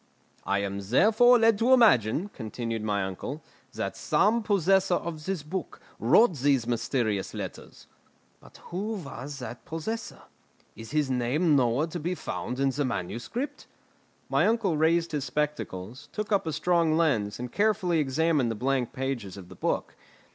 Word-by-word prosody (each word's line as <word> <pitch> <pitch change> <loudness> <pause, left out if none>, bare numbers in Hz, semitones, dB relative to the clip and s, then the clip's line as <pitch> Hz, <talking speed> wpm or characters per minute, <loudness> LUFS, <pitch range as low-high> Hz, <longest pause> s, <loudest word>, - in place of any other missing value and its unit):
"I 100 +1 0
am 100 0 -3
therefore 220 - +5
led 225 -2 +4
to 245 +3 +4
imagine," 185 - +4
continued 115 - -5
my 105 -2 0
uncle, 115 - -5 0.3
"that - - -3
some 220 +4 +2
possessor 195 -3 +2
of 160 -3 -5
this 190 -6 -2
book 170 +2 -5 0.2
wrote 175 - +4
these 135 -3 +2
mysterious 115 -4 -1
letters. - - -8 0.5
But - - -17
who 200 +5 -2
was 145 -6 -7
that 120 -2 -8
possessor? 215 +8 -5 0.5
Is 115 0 -10
his 150 -3 0
name 135 +6 +2
nowhere 125 +2 +2
to 170 +1 -6
be 175 +4 -2
found 125 -6 -5
in 135 0 +2
the 145 +3 -1
manuscript?" 120 - -4 0.6
My - - +2
uncle 220 -6 +1
raised 165 +2 +2
his 145 -3 -2
spectacles, 130 -8 -4
took 210 0 -4
up 200 -5 +2
a - - 0
strong 165 0 +2
lens, 120 -12 +1
and 125 0 -5
carefully 200 -5 +1
examined 150 -2 +1
the 115 - -2
blank 130 +1 -1
pages 125 -8 -4
of 90 -2 -11
the - - -11
book. - - -2
150 Hz, 155 wpm, -27 LUFS, 120-185 Hz, 0.6 s, therefore